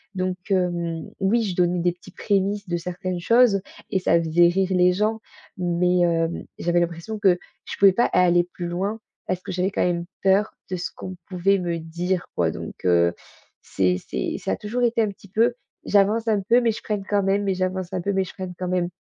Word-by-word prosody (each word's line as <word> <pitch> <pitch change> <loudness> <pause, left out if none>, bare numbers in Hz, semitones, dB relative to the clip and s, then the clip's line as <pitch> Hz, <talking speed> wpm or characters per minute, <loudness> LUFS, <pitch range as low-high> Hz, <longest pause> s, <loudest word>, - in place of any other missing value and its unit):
donc 185 -1 -1
hem, 175 -3 -1
oui, 220 +5 +2
je 190 -4 -3
donnais 180 0 +2
des 175 +1 +2
petits 175 - -15
prémices 200 0 0
de 175 - 0
certaines 180 +1 -4
choses 230 +2 +4 0.3
et 190 - +2
ça 170 -2 +3
faisait 170 +1 +4
rire 190 +2 +1
les 180 -1 +4
gens, 215 +4 0 0.4
mais 180 0 +1
hem, 170 -1 +1
j'avais 175 0 +1
l'impression 175 +5 -3
que 190 -4 +4 0.3
je - - -6
pouvais 195 -1 +7
pas 235 - +3
aller 175 -1 +3
plus 175 - -4
loin 195 +6 -2 0.3
parce 185 0 -2
que - - -7
j'avais 185 +2 0
quand - - 0
même 170 -1 -1 0.2
peur 195 +2 +3 0.2
de 185 - -1
ce 175 - -3
qu'on 185 0 -7
pouvait 195 +2 +2
me 175 -2 -2
dire, 170 +3 -2
quoi - - +2
donc - - -8
heu, 85 -1 +4 0.5
c'est 90 -1 0
c'est - - -2
ça - - -3
a - - 0
toujours 240 +4 -3
été 235 -1 +2
un 215 - 0
petit 200 - -17
peu, 230 +5 +2 0.3
j'avance 210 +3 +3
un 215 -2 +2
peu 235 +6 +3
mais 235 -1 +2
je 220 - -6
freine 210 -2 -2
quand 205 -1 +2
même 195 +1 +1
mais 195 -1 +1
j'avance 185 0 -2
un 185 - -1
peu 200 - -1
mais 190 0 +2
je 185 - -9
freine 185 -2 -6
quand 180 - -3
même, 180 -1 0
185 Hz, 220 wpm, -23 LUFS, 175-200 Hz, 0.5 s, pouvais